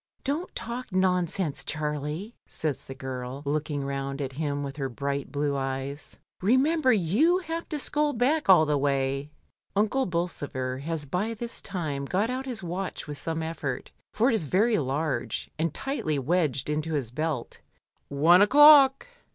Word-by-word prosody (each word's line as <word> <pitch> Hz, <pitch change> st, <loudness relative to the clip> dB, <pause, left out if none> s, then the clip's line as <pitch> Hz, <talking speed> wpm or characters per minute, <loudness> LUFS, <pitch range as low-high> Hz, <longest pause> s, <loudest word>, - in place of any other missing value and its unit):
"Don't 300 Hz, +7 st, -3 dB
talk 240 Hz, 0 st, -5 dB
nonsense, 180 Hz, -4 st, 0 dB
Charlie," 150 Hz, +7 st, -3 dB
says 155 Hz, -3 st, -3 dB
the 135 Hz, -, -8 dB
girl, 130 Hz, +1 st, -6 dB
looking 145 Hz, -1 st, -1 dB
round 135 Hz, 0 st, -3 dB
at 135 Hz, -2 st, -3 dB
him 145 Hz, 0 st, -2 dB
with 140 Hz, 0 st, -6 dB
her 135 Hz, -2 st, -2 dB
bright 140 Hz, +2 st, -3 dB
blue 145 Hz, -1 st, 0 dB
eyes. 135 Hz, +2 st, -4 dB, 0.3 s
"Remember 260 Hz, -, +3 dB
^(?« 275 Hz, -, +2 dB
have 330 Hz, 0 st, -5 dB
to 305 Hz, -, -2 dB
scull 295 Hz, +1 st, +1 dB
back 275 Hz, +2 st, +1 dB
all 175 Hz, -4 st, +8 dB
the 150 Hz, -1 st, +1 dB
way." 135 Hz, 0 st, 0 dB, 0.5 s
Unde 215 Hz, +4 st, +1 dB
Bolsover 145 Hz, -7 st, -3 dB
has 155 Hz, +1 st, -3 dB
by 195 Hz, +10 st, -2 dB
this 235 Hz, +1 st, -5 dB
time 155 Hz, -8 st, -3 dB
got 200 Hz, -, 0 dB
out 260 Hz, +1 st, -4 dB
his 235 Hz, -6 st, -4 dB
watch 180 Hz, +2 st, -4 dB
with 145 Hz, -2 st, -6 dB
some 160 Hz, +2 st, -3 dB
effort, 155 Hz, -5 st, -4 dB, 0.2 s
for 235 Hz, +4 st, +2 dB
it -, -, +1 dB
is 215 Hz, -8 st, 0 dB
very 210 Hz, -, +2 dB
large, 140 Hz, -1 st, -2 dB
and 165 Hz, 0 st, +1 dB
tightly 160 Hz, -, -2 dB
wedged 145 Hz, -2 st, 0 dB
into 155 Hz, +1 st, -1 dB
his 130 Hz, -6 st, -2 dB
belt 155 Hz, -2 st, -3 dB, 0.5 s
"One 160 Hz, +6 st, +5 dB
o'clock!" 280 Hz, +3 st, +7 dB
160 Hz, 160 wpm, -27 LUFS, 140-220 Hz, 0.5 s, all